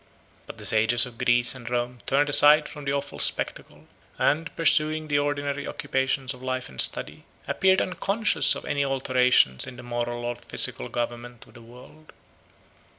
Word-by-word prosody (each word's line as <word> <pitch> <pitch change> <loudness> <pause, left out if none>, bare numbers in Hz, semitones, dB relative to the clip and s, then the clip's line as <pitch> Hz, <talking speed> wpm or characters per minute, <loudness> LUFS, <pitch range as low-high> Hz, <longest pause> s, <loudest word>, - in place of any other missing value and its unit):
But - - -10
the - - -10
sages 115 +3 +4
of 120 -2 -12
Greece 120 0 +2
and 125 -3 -9
Rome 120 0 -3
turned 145 +2 +2
aside 150 +1 +6
from 150 -2 -10
the 140 - -1
awful 140 0 -4
spectacle, - - -2 0.3
and, 160 +3 0
pursuing 155 -1 +2
the 145 -1 +1
ordinary 145 0 -3
occupations 135 -1 -1
of 125 - -14
life 130 0 -4
and 65 - 0
study, - - -1 0.2
appeared 190 0 +2
unconscious 195 -3 +1
of - - -8
any 140 0 -1
alterations 125 - +2
in 125 - -9
the 125 - -11
moral 120 0 -4
or 120 0 -3
physical 60 - -3
government 120 0 -6
of - - -21
the 120 - -15
world. 125 +7 -17
130 Hz, 165 wpm, -25 LUFS, 120-145 Hz, 0.3 s, aside